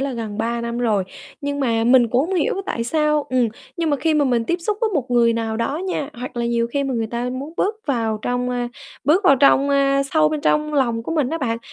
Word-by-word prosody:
là 275 -1 -2
gần 220 -3 -5
3 235 +1 -1
năm 235 0 -3
rồi, 215 -5 +1 0.4
nhưng 285 0 -3
mà 230 -3 +1
mình 245 -1 +5
cũng 245 +3 +2
hông 385 - -1
hiểu 455 +6 +1
tại 230 - -2
sao 300 +3 +1
ừm, 250 -3 +2 0.3
nhưng 330 -2 0
mà 285 - +2
khi 320 +2 +1
mà 295 -1 +3
mình 240 -3 +1
tiếp 340 - 0
xúc 415 +4 -2
với 450 - +1
một 260 -4 -1
người 235 -1 +4
nào 225 -1 -2
đó 230 +6 -1
nha, 300 -5 -3
hoặc 250 0 -7
là 235 0 -1
nhiều 235 0 +1
khi 280 +4 -2
mà 270 -2 -2
người 225 -1 -1
ta 240 +2 -3
muốn 275 +5 -6
bước 425 +3 0
vào 225 -6 0
trong, 245 0 -1
a, 245 -1 -2 0.4
bước 340 +8 +3
vào 275 - +6
trong, 275 +1 +4
a, 275 0 +3
sâu 305 +2 +2
bên 305 -1 -3
trong 300 0 +1
lòng 235 -5 +1
của 325 - -4
mình 290 -5 +1
á 330 - -2
bạn, 230 -4 -1
255 Hz, 260 wpm, -21 LUFS, 235-300 Hz, 0.4 s, vào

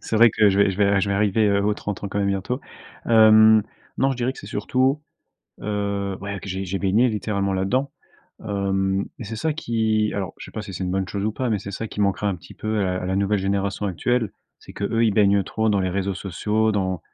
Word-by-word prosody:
c'est 110 - -2
vrai 115 0 +7
que 105 -1 +4
je 100 +1 +1
vais 100 -1 +4
je 95 - -5
vais 100 -1 +3
je 100 - 0
vais - - +1
arriver, 105 +1 +2
heu, 100 0 +2
aux 105 0 +1
30 105 -1 -5
ans 100 - -3
quand 100 - -3
même 100 0 +1
bientôt. 100 +7 -2 0.5
Hem, 110 -1 +7 0.4
non, 135 0 +3
je 130 - -2
dirais 125 +1 -1
que - - -15
c'est - - -10
surtout, 130 +7 0 0.6
heu, 100 -2 -2
ouais, 100 0 -5
que 100 - -8
j'ai 95 +1 -3
j'ai 95 +1 -3
baigné 105 +6 +3
littéralement 100 -2 -1
là-dedans. 125 +9 0 0.5
Hem 95 -1 0
et 120 - -6
c'est 110 +2 -6
ça 155 +5 -1
qui, 110 -6 0
alors 95 -2 -3
je - - -8
sais - - -11
pas 110 - -5
si 100 -3 -8
c'est 95 - -3
une 90 - -2
bonne 95 0 -1
chose 100 0 -3
ou 110 - 0
pas, 125 +2 -2
mais 105 -3 +1
c'est 100 +1 -7
ça 110 +3 -4
qui 105 - -2
manquera 100 +1 +1
un 95 - -1
petit 85 - -14
peu 110 -1 -2
à - - +2
la 90 0 -2
à 90 - -3
la 95 +1 -1
nouvelle 100 +1 +1
génération 100 +1 -1
actuelle. 110 +4 0 0.3
C'est - - -13
que, - - -7
eux, 115 +2 +1
ils 110 - +3
baignent 100 -1 +4
trop 110 0 -1
dans 100 - +2
les 95 - 0
réseaux 95 +1 -2
sociaux, 105 +4 0
dans 95 -4 -1
100 Hz, 260 wpm, -23 LUFS, 95-110 Hz, 0.6 s, vrai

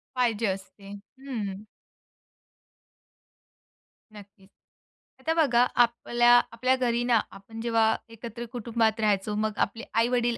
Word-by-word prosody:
पाहिजे 230 -3 +1
असते. 195 +1 -6 0.3
हं. 215 -7 -5 2.5
नक्कीच. 200 -1 -15 0.7
आता 320 +5 -1
बघा, 260 -7 +3
आपल्या 240 0 +3 0.2
आपल्या 255 +3 +1
घरी 240 -2 0
ना, 240 -2 +3
आपण 225 +3 -10
जेव्हा 225 -1 +2
एकत्र 230 +1 -8
कुटुंबात 230 -2 0
राहायचो, 210 -1 0
मग 215 0 -2
आपले 225 +3 -11
आई-वडील 240 0 +1
230 Hz, 105 wpm, -27 LUFS, 210-240 Hz, 2.5 s, बघा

